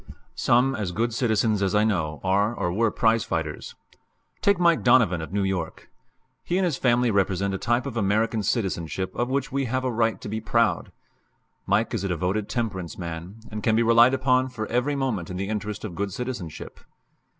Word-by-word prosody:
Some 125 +3 +2
as 105 -6 -3
good 115 +5 -1
citizens 110 -3 +1
as 100 +1 +1
I 105 - +4
know 80 -8 -1
are 100 +4 +1
or 85 -5 -2
were 115 +3 +2
prize 115 +1 +2
fighters. 80 -6 -4 0.7
Take 200 -1 +3
Mike 170 -2 +4
Donovan, 115 -9 +4
of 80 - -7
New 100 0 0
York. 95 -4 -4 0.5
He 175 - -1
and 190 - +2
his 170 -6 0
family 125 -2 +2
represent 100 -1 +1
a 95 - -3
type 120 +2 0
of 135 -4 -5
American 110 +1 +1
citizenship 95 - -2
of 120 +1 -1
which 140 +1 -1
we 135 0 0
have 130 +2 -1
a 130 - 0
right 115 0 +1
to - - -8
be 110 +2 -3
proud. 115 +1 +1 0.8
Mike - - +1
is - - -2
a - - 0
devoted 95 +4 -1
temperance 100 -8 -3
man, 85 +4 -7
and 105 0 -5
can 110 0 +2
be 115 - +3
relied 115 +3 +5
upon 130 0 +2
for 115 -4 -5
every 125 +5 +1
movement 125 -11 -2
in 90 - -5
the 100 +2 -3
interest 105 0 -4
of 100 - -6
good 100 +3 -3
citizenship. 110 - -6
110 Hz, 195 wpm, -25 LUFS, 95-120 Hz, 0.8 s, relied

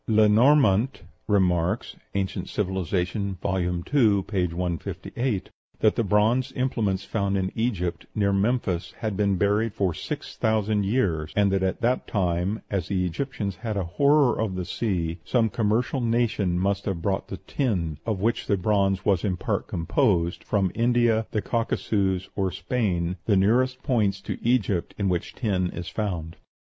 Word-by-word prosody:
Lenormant 110 - +4 0.2
remarks 90 -1 +1 0.2
("Anc. 95 -1 -2
Civil.," 95 -2 -1
vol. 95 +2 -1
ii., 90 -1 -1 0.4
p. 95 -3 0
158) 90 - -3 0.3
that 110 - +3
the 115 - +1
bronze 110 +6 +2
implements 110 -7 -1
found 100 -2 -1
in 95 -1 -1
Egypt, 100 -7 -2
near 100 -2 +2
Memphis, 100 -3 0
had 110 -3 -3
been 100 -1 +2
buried 105 +3 +1
for 95 -4 +1
six - - -6
thousand 110 -2 +1
years; 90 -10 0
and 100 -1 +3
that 95 0 +1
at 95 +3 -1
that 125 +2 +1
time, 90 +1 -1
as 95 -5 -1
the 95 -2 0
Egyptians 100 +1 -3
had 110 0 -3
a 100 - 0
horror 140 - +3
of 105 -4 -1
the 90 -1 -3
sea, 90 -4 -2
some 115 +5 +2
commercial 115 +5 0
nation 115 -6 +1
must 100 +2 0
have 90 -5 -3
brought 95 -1 -1
the 95 - -6
tin, 90 - -2
of 110 -4 -2
which 115 +5 0
the 100 - +2
bronze 95 0 +1
was 95 -4 +2
in 95 -3 0
part - - -2
composed, 85 -1 +1
from 95 -4 0
India, 115 -2 +2
the 105 - -2
Caucasus, 100 -5 0
or 95 -2 0
Spain, 95 -3 -1
the 100 -3 +3
nearest 130 +6 +2
points 105 -8 +1
to - - -6
Egypt 110 -7 +1
in 100 -2 0
which 90 -2 -2
tin 95 -7 0
is 90 0 -6
found. 85 -7 -3
100 Hz, 155 wpm, -25 LUFS, 90-115 Hz, 0.4 s, Lenormant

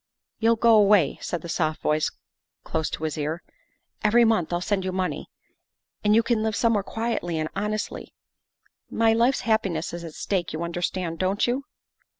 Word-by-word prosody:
" - - -60
You'll 230 +1 +4
go 230 0 +5
away," 200 -7 +4
said 170 -3 -4
the - - -6
soft 155 -2 -1
voice 150 0 +1 0.5
close 160 -1 -2
to - - -6
his 155 -1 -2
ear; 155 +4 -3 0.3
" - - -35
every 230 +3 +5
month 220 -8 +1
I'll 175 - 0
send 190 +1 -1
you 185 - -2
money, 185 0 -3 0.7
and 210 0 +4
you 230 - +5
can 230 -1 +1
live 220 -1 0
somewhere 230 -2 +2
quietly 220 -6 -2
and 155 0 -2
honestly. 210 +1 -3 0.7
My 225 0 +3
life's 240 +4 +2
happi 220 -3 +2
ness 165 -1 -3
is 170 0 -6
at 160 -2 -8
stake 180 -6 -2
you 160 +2 -3
understand, 170 0 -3
don't 190 +2 +1
you?" 255 +3 -1
195 Hz, 185 wpm, -25 LUFS, 170-225 Hz, 0.7 s, go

